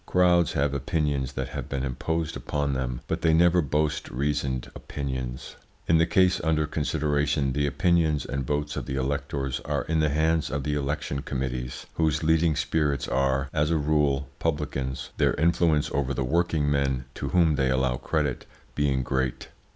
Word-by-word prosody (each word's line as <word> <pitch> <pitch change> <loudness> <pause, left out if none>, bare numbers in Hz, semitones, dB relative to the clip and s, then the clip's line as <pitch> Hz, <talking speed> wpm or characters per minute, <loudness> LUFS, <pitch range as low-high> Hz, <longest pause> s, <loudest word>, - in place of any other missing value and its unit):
Crowds 90 -2 +3
have 70 0 +1
opinions 70 -1 -1
that - - -3
have - - -6
been 70 -1 -2
imposed 80 +5 -2
upon 70 -1 -2
them, 65 -2 -3
but - - -2
they 80 -1 +4
never 85 +1 +5
boast 75 0 -1
reasoned 70 -1 -2
opinions. 65 -3 -5 0.3
In 80 -1 +4
the 80 - +3
case 95 0 +3
under 80 -1 +2
consideration 75 -2 0
the 70 +1 +1
opinions 80 -1 +2
and 70 0 -3
votes 75 +3 -2
of - - -4
the 65 - -3
electors 70 0 -2
are - - -2
in 80 0 0
the 75 -1 +3
hands 80 +2 +1
of 70 +1 -2
the 75 - -1
election 75 0 -2
committees, 65 -2 -4
whose 80 -1 +1
leading 80 0 +3
spirits 75 -3 0
are, 70 0 +1
as 75 0 +1
a 85 - +2
rule, 75 -2 +1
publicans, 70 -4 -2
their - - +2
influence 80 -1 +2
over 70 0 -1
the 65 - 0
working 80 0 +1
men, 70 -2 0
to - - -4
whom 85 -4 +4
they 70 -2 +1
allow 65 -1 +1
credit, 75 -4 -2 0.3
being 70 -3 +1
great. 65 +1 -2
75 Hz, 170 wpm, -26 LUFS, 65-80 Hz, 0.3 s, never